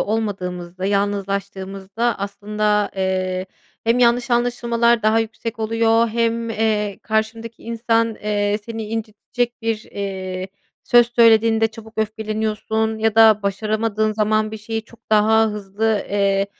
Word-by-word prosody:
olmadığımızda, 185 -4 -3
yalnızlaştığımızda 200 +2 -2
aslında, 210 +1 -1
eee, 185 -1 -1 0.4
hem 230 +2 +2
yanlış 240 0 +3
anlaşılmalar 235 -1 +2
daha 215 +1 +3
yüksek 225 +1 -4
oluyor 225 +1 +2
hem, 230 0 0
eee, 210 -2 0
karşındaki 225 +1 -2
insan, 230 -1 0
eee, 205 -1 -1
seni 225 -1 -5
incitecek 225 +2 -4
bir, 225 -1 -1
eee, 190 -2 -4 0.4
söz 240 -1 +5
söylediğinde 225 -1 +5
çabuk 220 0 -13
öfkeleniyorsun 220 0 -1
ya 220 0 +1
da 220 -2 +6
başaramadığın 215 +2 0
zaman 215 0 +1
bir 220 - -6
şeye 225 +1 -4
çok 230 +1 -20
daha 220 +1 +4
hızlı, 210 +1 -1
eee, 200 -1 +2
220 Hz, 120 wpm, -20 LUFS, 205-225 Hz, 0.4 s, da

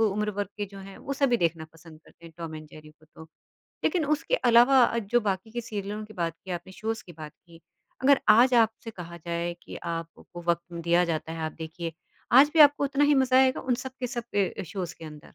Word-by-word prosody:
उम्र 210 -1 +1
वर्ग 205 -2 -2
के 205 - -2
जो 195 0 -12
हैं 195 0 -11
वो 275 - -5
सभी 270 -3 +2
देखना 165 -4 -1
पसंद 165 -1 -16
करते 170 - -21
हैं 165 - -14
टॉम 165 -2 -6
एंड 155 0 -9
जेरी 155 0 -14
को 155 0 -25
तो। 160 - -11 0.6
लेकिन 355 -5 +1
उसके 305 +10 0 0.2
अलावा 240 0 +5
जो 230 +2 +1
बाकी 200 0 -2
के 240 +2 -4
सीरियलों 210 -2 -5
की 215 0 -14
बात 170 -4 -2
की 190 - -9
आपने, 175 +1 -6
शोज़ 225 +3 -4
की 175 - -11
बात 155 -1 -10
की, 170 -1 -20 0.4
अगर 275 +1 +5
आज 240 +4 +6
आपसे 225 0 +2
कहा 170 -4 -9
जाए 170 0 -2
कि - - -9
आपको 170 +1 -7
वक़्त 170 +1 -1
दिया 170 +1 +3
जाता 160 -1 -3
है 165 - -6
आप 155 - -5
देखिए, 165 +1 -6 0.4
आज 270 +4 +7
भी 320 - +5
आपको 290 -1 +7
उतना 280 +1 +2
ही 290 0 +4
मज़ा 260 -1 +4
आएगा 260 0 +3
उन 255 -2 0
सब 260 - -6
के 250 - -1
सब 240 -2 -5 0.3
अ, - - -2
शोज़ 175 0 -6
के - - -10
अंदर? 150 -1 -10
195 Hz, 230 wpm, -27 LUFS, 170-240 Hz, 0.6 s, आज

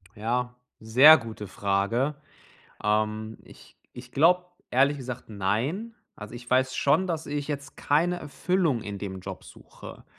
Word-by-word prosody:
Ja, 125 +3 -2 0.2
sehr 130 +8 +8
gute 110 -4 -8
Frage. 100 +10 0 0.7
Ähm, 110 +1 -1
ich - - -18 0.2
ich 125 0 -11
glaube, 180 +5 +4 0.2
ehrlich 140 +3 +3
gesagt 125 -1 -7
nein. 120 - -2 0.2
Also, 105 +2 -9
ich 120 0 -10
weiß 130 0 +2
schon, 155 +7 +2
dass 160 -2 -3
ich 145 0 -4
jetzt 140 -2 -5
keine 170 +5 +1
Erfüllung 150 - -1
in 100 -1 -6
dem 95 -2 -6
Job - - -8
suche. - - -13
125 Hz, 140 wpm, -26 LUFS, 110-150 Hz, 0.7 s, sehr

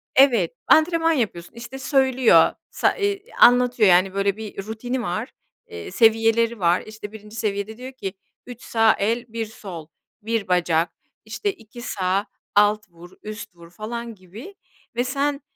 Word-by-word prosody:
evet, 240 -10 +4
antrenman 330 +1 +4
yapıyorsun. 200 - -3
İşte 235 +3 -8
söylüyor, 260 - +4 0.2
sa - - +1
ııı, 405 0 +1 0.2
anlatıyor 245 -4 +6
yani 185 +2 +4
böyle 200 +1 0
bir 210 -3 -7
rutini 245 +3 -3
var, 215 +5 -3 0.4
eee, 440 -2 -8
seviyeleri 225 0 +3
var, 175 0 +3
işte 215 -1 -9
1. 215 0 -12
seviyede 210 0 -3
diyor 255 +1 -8
ki, 195 -7 -6 0.3
"3 245 -1 -10
sağ 225 -1 +3
el, 230 +4 0
1 230 -1 -2
sol, 190 -7 -9 0.3
1 225 -1 -2
bacak, 175 -2 +2 0.4
işte 410 -2 -2
2 225 +2 -13
sağ 195 -3 -1 0.3
alt 210 0 +3
vur, 175 +1 -15
üst 215 -3 -8
vur," 170 -1 -15
falan 230 +3 -6
gibi 210 - -12 0.4
ve 245 - +1
sen, 280 +2 -1
220 Hz, 150 wpm, -23 LUFS, 195-245 Hz, 0.4 s, anlatıyor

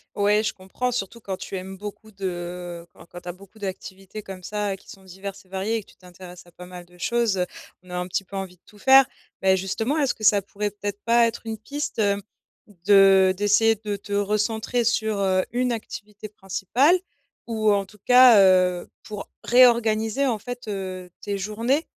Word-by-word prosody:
Ouais, 210 +1 +3
je 220 - -1
comprends, 195 +7 -3
surtout 235 0 -4
quand 190 -3 -5
tu - - -7
aimes 190 +1 -7
beaucoup 210 +2 -9
de, 195 -1 -7 0.6
heu, 170 - -23
quand - - -16
quand 175 +1 -11
tu 175 - -8
as - - -4
beaucoup 200 +4 -17
d'activités 195 +1 -7
comme 190 -1 -9
ça 205 +1 -2
qui 190 - -19
sont 195 - -12
diverses 190 +1 -9
et 185 - -27
variées 195 +4 -2
et 225 - -2
que - - -24
tu - - -23
t'intéresses 180 -1 -13
à - - -18
pas 180 +1 -12
mal 180 -1 -10
de 180 0 -21
choses, 235 0 0
heu, 180 - +1 0.4
on 180 - -14
a 180 - -3
un 180 - -2
petit 190 +2 -2
peu 195 - -11
envie 190 -2 -5
de 175 - -40
tout 210 - -19
faire. 265 +2 +7 0.4
Beh, 190 0 +5
justement, 225 +10 -1
est-ce 275 -3 +1
que 215 - -12
ça 205 -1 +5
pourrait 205 +1 -4
peut-être 205 0 -5
pas 235 0 +4
être 230 - -5
une 220 -1 -4
piste, 285 +1 -5
heu, 200 -1 +2 0.7
de 195 -2 +6
d'essayer 210 +2 +4
de 210 -1 -4
te 200 +1 -11
recentrer 215 +4 0
sur, 220 -2 0
heu, 190 -1 +2
une 250 +1 0
activité 210 -2 -7
principale 220 - +1 0.5
ou 220 -2 +1
en 200 -1 +1
tout 210 +1 -19
cas, 250 -3 +8
heu, 185 -2 +3
pour 210 -2 -8
réorganiser, 235 0 +4
en 235 -5 0
fait, 245 +1 -8
heu, 185 -3 -5
tes 200 -1 -3
journées? 230 - -1
205 Hz, 205 wpm, -24 LUFS, 190-225 Hz, 0.7 s, cas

